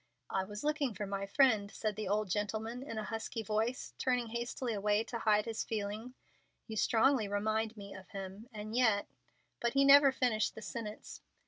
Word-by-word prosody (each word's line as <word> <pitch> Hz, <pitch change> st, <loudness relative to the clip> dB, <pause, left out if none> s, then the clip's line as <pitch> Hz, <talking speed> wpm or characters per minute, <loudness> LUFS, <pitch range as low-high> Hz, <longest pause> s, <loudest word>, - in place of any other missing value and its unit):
"I 190 Hz, -1 st, 0 dB
was 210 Hz, +2 st, -7 dB
looking 295 Hz, -6 st, 0 dB
for 205 Hz, -, -3 dB
my 195 Hz, 0 st, -3 dB
friend," 215 Hz, -3 st, +4 dB
said 215 Hz, 0 st, -3 dB
the 215 Hz, -1 st, -4 dB
old 210 Hz, +2 st, +1 dB
gentleman, 220 Hz, +5 st, -2 dB
in 265 Hz, -5 st, -6 dB
a 215 Hz, -, -2 dB
husky 225 Hz, +1 st, -4 dB
voice, 220 Hz, +4 st, -1 dB
turning 250 Hz, -3 st, +1 dB
hastily 235 Hz, +1 st, -3 dB
away 210 Hz, +1 st, +2 dB
to 235 Hz, 0 st, -5 dB
hide 210 Hz, -1 st, +3 dB
his 225 Hz, -1 st, -2 dB
feeling. 215 Hz, +3 st, -4 dB, 0.5 s
"You 220 Hz, -, -6 dB
strongly 225 Hz, +1 st, +3 dB
remind 215 Hz, +2 st, -1 dB
me 200 Hz, -1 st, -8 dB
of 190 Hz, -, -11 dB
him; 195 Hz, +4 st, -7 dB
and 215 Hz, 0 st, -6 dB
yet 220 Hz, -5 st, +3 dB, 0.3 s
" -, -, -42 dB
But 235 Hz, 0 st, +1 dB
he 275 Hz, 0 st, +4 dB
never 280 Hz, 0 st, +8 dB
finished 240 Hz, -5 st, +1 dB
the 220 Hz, -, -8 dB
sentence. 215 Hz, -2 st, -6 dB
220 Hz, 190 wpm, -33 LUFS, 205-240 Hz, 0.5 s, never